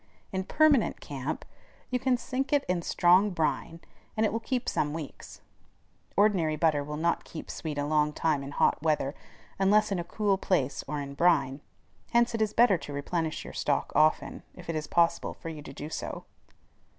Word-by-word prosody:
In 190 Hz, -1 st, -2 dB
permanent 290 Hz, -4 st, +3 dB
camp 140 Hz, +2 st, -5 dB, 0.5 s
you 250 Hz, -, +1 dB
can 255 Hz, 0 st, +2 dB
sink 255 Hz, +3 st, -3 dB
it 290 Hz, -1 st, +2 dB
in 180 Hz, -1 st, 0 dB
strong 180 Hz, +4 st, +4 dB
brine, 165 Hz, -1 st, -2 dB, 0.4 s
and 220 Hz, -, +3 dB
it 210 Hz, -, 0 dB
will 225 Hz, -, 0 dB
keep 250 Hz, +2 st, -2 dB
some 145 Hz, 0 st, 0 dB
weeks. 155 Hz, -4 st, -8 dB, 0.8 s
Ordinary 190 Hz, -7 st, +3 dB
butter 155 Hz, -2 st, +2 dB
will 150 Hz, +1 st, -5 dB
not 170 Hz, +2 st, 0 dB
keep 160 Hz, -, -8 dB
sweet 155 Hz, -3 st, -5 dB
a 145 Hz, -, 0 dB
long 150 Hz, 0 st, +2 dB
time 150 Hz, -2 st, 0 dB
in 135 Hz, -, -6 dB
hot 145 Hz, -, +2 dB
weather 150 Hz, -3 st, +1 dB, 0.5 s
unless 210 Hz, +2 st, +4 dB
in 195 Hz, -, 0 dB
a -, -, -2 dB
cool 195 Hz, +2 st, 0 dB
place 140 Hz, -10 st, 0 dB
or 150 Hz, +1 st, -3 dB
in 140 Hz, -1 st, -5 dB
brine. 140 Hz, -4 st, +2 dB, 0.5 s
Hence 235 Hz, 0 st, +4 dB
it 225 Hz, -, -1 dB
is 215 Hz, -1 st, +2 dB
better 215 Hz, -6 st, +4 dB
to 145 Hz, -, -8 dB
replenish 160 Hz, +3 st, -2 dB
your -, -, -9 dB
stock -, -, 0 dB
often, 155 Hz, 0 st, +2 dB
if 180 Hz, -2 st, -6 dB
it -, -, -5 dB
is 155 Hz, -1 st, -3 dB
possible 170 Hz, -1 st, +1 dB
for 165 Hz, -, -7 dB
you 155 Hz, -2 st, -7 dB
to 145 Hz, -, -10 dB
do 145 Hz, +2 st, -7 dB
so. 160 Hz, -, -5 dB
165 Hz, 190 wpm, -29 LUFS, 150-210 Hz, 0.8 s, strong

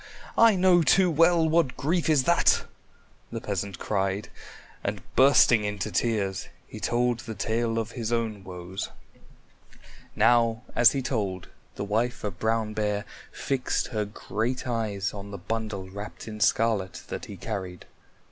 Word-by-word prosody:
I 230 Hz, -2 st, +6 dB
know 180 Hz, -1 st, +5 dB
too 180 Hz, +4 st, +4 dB
well 165 Hz, +1 st, +4 dB
what 160 Hz, -4 st, +2 dB
grief 165 Hz, +3 st, 0 dB
is 150 Hz, -4 st, +4 dB
that!" 170 Hz, +5 st, +3 dB, 0.7 s
the 115 Hz, -, -3 dB
peasant 100 Hz, -4 st, -4 dB
cried, 100 Hz, +1 st, -1 dB, 0.5 s
and -, -, -3 dB
bursting 130 Hz, -4 st, +6 dB
into 105 Hz, -2 st, -3 dB
tears, 100 Hz, -5 st, -1 dB, 0.2 s
he -, -, -9 dB
told 120 Hz, 0 st, +1 dB
the 115 Hz, -3 st, -7 dB
tale 115 Hz, +2 st, -1 dB
of 115 Hz, 0 st, -2 dB
his 115 Hz, -2 st, -4 dB
own 110 Hz, -4 st, -1 dB
woes. 90 Hz, 0 st, -6 dB, 1.3 s
Now 115 Hz, -1 st, +3 dB
as 120 Hz, -1 st, +6 dB
he 135 Hz, -2 st, -2 dB
told, 100 Hz, -8 st, -2 dB, 0.3 s
the -, -, -4 dB
wife 115 Hz, +4 st, -1 dB
of 100 Hz, -3 st, -4 dB
Brown 110 Hz, -1 st, 0 dB
Bear 105 Hz, -1 st, -1 dB, 0.3 s
fixed 135 Hz, -2 st, -1 dB
her 110 Hz, -3 st, -1 dB
great 115 Hz, +5 st, -3 dB
eyes 105 Hz, -5 st, -2 dB
on 100 Hz, 0 st, -8 dB
the 100 Hz, -, -6 dB
bundle 110 Hz, -4 st, -4 dB
wrapped 100 Hz, +4 st, -8 dB
in 105 Hz, -1 st, -7 dB
scarlet 105 Hz, -4 st, +1 dB
that -, -, -5 dB
he 100 Hz, -, -9 dB
carried. 95 Hz, -3 st, -6 dB
110 Hz, 145 wpm, -27 LUFS, 100-125 Hz, 1.3 s, I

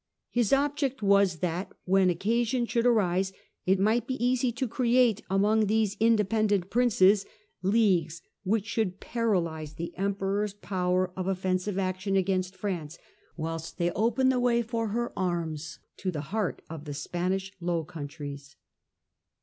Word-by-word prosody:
His 240 Hz, -4 st, +1 dB
object 275 Hz, -3 st, +1 dB
was 200 Hz, -4 st, +3 dB
that 180 Hz, +2 st, -2 dB
when 190 Hz, 0 st, +4 dB
occasion 235 Hz, +7 st, +1 dB
should 235 Hz, +1 st, +1 dB
arise 190 Hz, -4 st, +2 dB, 0.3 s
it 190 Hz, +1 st, +4 dB
might 220 Hz, +4 st, +2 dB
be 260 Hz, -, -1 dB
easy 250 Hz, 0 st, +2 dB
to 255 Hz, +2 st, -2 dB
create, 235 Hz, -2 st, +3 dB
among 210 Hz, +3 st, +3 dB
these 215 Hz, -1 st, +1 dB
independent 215 Hz, -3 st, +2 dB
Princes, 210 Hz, -4 st, +4 dB, 0.4 s
leagues 185 Hz, -6 st, +2 dB, 0.2 s
which 205 Hz, +1 st, +1 dB
should 210 Hz, -4 st, -1 dB
paralyse 170 Hz, -10 st, -1 dB
the 170 Hz, +1 st, -6 dB
Emperor's 200 Hz, +1 st, -1 dB
power 185 Hz, -2 st, 0 dB
of 185 Hz, -1 st, -3 dB
offensive 185 Hz, +1 st, -1 dB
action 185 Hz, +1 st, -1 dB
against 185 Hz, -1 st, 0 dB
France, 175 Hz, -5 st, -4 dB, 0.4 s
whilst 165 Hz, 0 st, -5 dB
they 175 Hz, -1 st, +1 dB
opened 235 Hz, +6 st, +2 dB
the 255 Hz, -, +1 dB
way 240 Hz, -1 st, +2 dB
for 230 Hz, -1 st, -2 dB
her 235 Hz, +3 st, -2 dB
arms 165 Hz, -4 st, -2 dB, 0.2 s
to 185 Hz, -, -2 dB
the 155 Hz, -5 st, -3 dB
heart 215 Hz, -5 st, -1 dB
of 160 Hz, -1 st, -8 dB
the 145 Hz, -1 st, -5 dB
Spanish 185 Hz, +6 st, -2 dB
Low 170 Hz, -1 st, -1 dB
Countries. 145 Hz, -3 st, -8 dB
195 Hz, 140 wpm, -28 LUFS, 180-225 Hz, 0.4 s, when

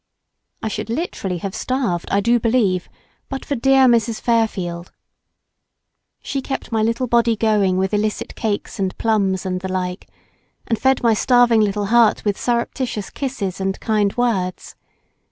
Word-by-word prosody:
I -, -, -1 dB
should 215 Hz, +1 st, -4 dB
literally 225 Hz, -, -3 dB
have 190 Hz, +2 st, -5 dB
starved, 230 Hz, -7 st, -2 dB
I 200 Hz, -, +2 dB
do 235 Hz, +3 st, +3 dB
believe, 220 Hz, -6 st, +1 dB, 0.4 s
but 270 Hz, -1 st, -5 dB
for -, -, -2 dB
dear 270 Hz, +1 st, +4 dB
Mrs. 230 Hz, -2 st, +2 dB
Fairfield. 190 Hz, -7 st, -1 dB, 1.3 s
She 275 Hz, -, -3 dB
kept 270 Hz, -1 st, -5 dB
my 220 Hz, -1 st, +1 dB
little 230 Hz, +3 st, 0 dB
Body 235 Hz, -1 st, +2 dB
going 210 Hz, -4 st, +2 dB
with 190 Hz, +2 st, 0 dB
illicit 210 Hz, +1 st, -1 dB
cakes 210 Hz, -2 st, -3 dB
and 190 Hz, -1 st, -2 dB
plums 200 Hz, -4 st, 0 dB
and 185 Hz, -1 st, -2 dB
the 190 Hz, 0 st, -4 dB
like, 180 Hz, 0 st, -3 dB, 0.6 s
and 225 Hz, -2 st, -1 dB
fed 265 Hz, -1 st, +2 dB
my 230 Hz, -1 st, +4 dB
starving 240 Hz, 0 st, +4 dB
little 205 Hz, 0 st, 0 dB
heart 235 Hz, -2 st, +4 dB
with 205 Hz, -2 st, -1 dB
surreptitious 240 Hz, -2 st, -2 dB
kisses 205 Hz, -9 st, -4 dB
and 190 Hz, 0 st, -2 dB
kind 210 Hz, -2 st, 0 dB
words. 195 Hz, -7 st, -1 dB
220 Hz, 155 wpm, -20 LUFS, 195-240 Hz, 1.3 s, dear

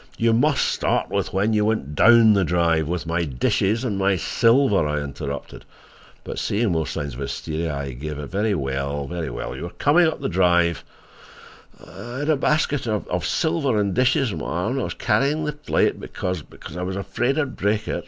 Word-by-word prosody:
"You 115 Hz, 0 st, +2 dB
must 140 Hz, +5 st, +2 dB
start -, -, 0 dB
with -, -, -1 dB
when 100 Hz, +4 st, +1 dB
you 105 Hz, -1 st, +2 dB
went 105 Hz, -10 st, -1 dB
DOWN 115 Hz, +5 st, +6 dB
the 100 Hz, -2 st, +3 dB
drive, 85 Hz, -2 st, +1 dB
with 85 Hz, +1 st, -3 dB
my 85 Hz, +1 st, 0 dB
dishes 95 Hz, -, 0 dB
and 105 Hz, -6 st, -2 dB
my 95 Hz, 0 st, +2 dB
silver," 115 Hz, -, +3 dB
I 75 Hz, 0 st, -1 dB
interrupted, 70 Hz, 0 st, -6 dB, 0.6 s
but, -, -, -5 dB
seeing 105 Hz, 0 st, 0 dB
more 80 Hz, -2 st, 0 dB
signs 70 Hz, +2 st, -4 dB
of -, -, -9 dB
hysteria, 75 Hz, +3 st, -3 dB
I 70 Hz, -1 st, -4 dB
gave 75 Hz, +4 st, -6 dB
in. 75 Hz, -, -5 dB
"Very 105 Hz, +4 st, 0 dB
well. 70 Hz, -1 st, -3 dB
You 70 Hz, -6 st, -5 dB
were 85 Hz, -, -4 dB
coming 165 Hz, +4 st, +4 dB
up 160 Hz, -, -2 dB
the -, -, -2 dB
drive—" 85 Hz, -2 st, +2 dB, 1.0 s
"I 120 Hz, +1 st, -8 dB
had 145 Hz, +2 st, -2 dB
a -, -, +4 dB
basket 145 Hz, -2 st, 0 dB
of—of 100 Hz, -5 st, -2 dB
silver 155 Hz, -9 st, +1 dB
and 100 Hz, -2 st, 0 dB
dishes 125 Hz, 0 st, +2 dB
on 80 Hz, -, -5 dB
my -, -, -5 dB
arm 90 Hz, +7 st, -1 dB
and 135 Hz, +1 st, -1 dB
I -, -, -1 dB
was -, -, -5 dB
carrying 150 Hz, +3 st, +1 dB
the 150 Hz, -, -2 dB
plate, 150 Hz, +1 st, 0 dB
because—because 90 Hz, -5 st, -6 dB
I 90 Hz, -, -4 dB
was 95 Hz, +1 st, -3 dB
afraid 120 Hz, +7 st, -1 dB
I'd 145 Hz, -4 st, -1 dB
break 105 Hz, +1 st, 0 dB
it. -, -, -2 dB
95 Hz, 195 wpm, -23 LUFS, 80-120 Hz, 1.0 s, DOWN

